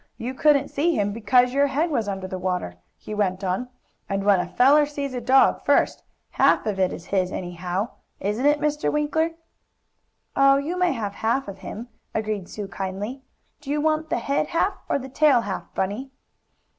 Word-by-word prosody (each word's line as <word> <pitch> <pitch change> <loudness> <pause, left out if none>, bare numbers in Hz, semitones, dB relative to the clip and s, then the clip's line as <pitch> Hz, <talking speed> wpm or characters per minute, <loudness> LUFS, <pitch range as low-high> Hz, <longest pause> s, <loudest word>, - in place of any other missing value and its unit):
You 250 +3 -4
couldn't 285 0 +3
see 320 +3 +1
him 205 0 0
'cause 250 +2 +4
your 280 +1 +3
head 310 +5 0
was 230 -7 0
under 190 -1 -3
the 185 0 -5
water," 180 - -2 0.2
he 215 - -8
went 195 -2 -1
on, 190 +7 -2 0.4
"and 195 0 -1
when 200 -2 +4
a 180 - -2
feller 280 +10 +5
sees 285 -2 -4
a 250 - -3
dog 265 +3 +4
first, - - +2 0.3
half - - +3
of 205 -3 -2
it 185 -1 +2
is 170 - -8
his, 185 -1 +1
anyhow; 180 +4 -3 0.3
isn't 210 +8 0
it, 295 0 +4
Mr. 300 0 0
Winkler?" 315 +2 0 1.0
"Oh, 275 0 +5
you 300 +6 -2
may 360 -3 +2
have 210 -5 -4
half 230 +6 -1
of 200 - -8
him," 230 +4 -7 0.3
agreed 215 -4 -2
Sue 205 -2 -6
kindly. 195 +7 -5 0.4
"Do 295 -2 -11
you 295 +1 +1
want 310 +1 0
the - - 0
head 280 +1 0
half, 355 +4 +1 0.2
or - - +2
the 265 -1 -7
tail 270 -2 +4
hall, 200 -4 -5
Bunny?" 205 +8 -2
245 Hz, 190 wpm, -24 LUFS, 195-285 Hz, 1.0 s, feller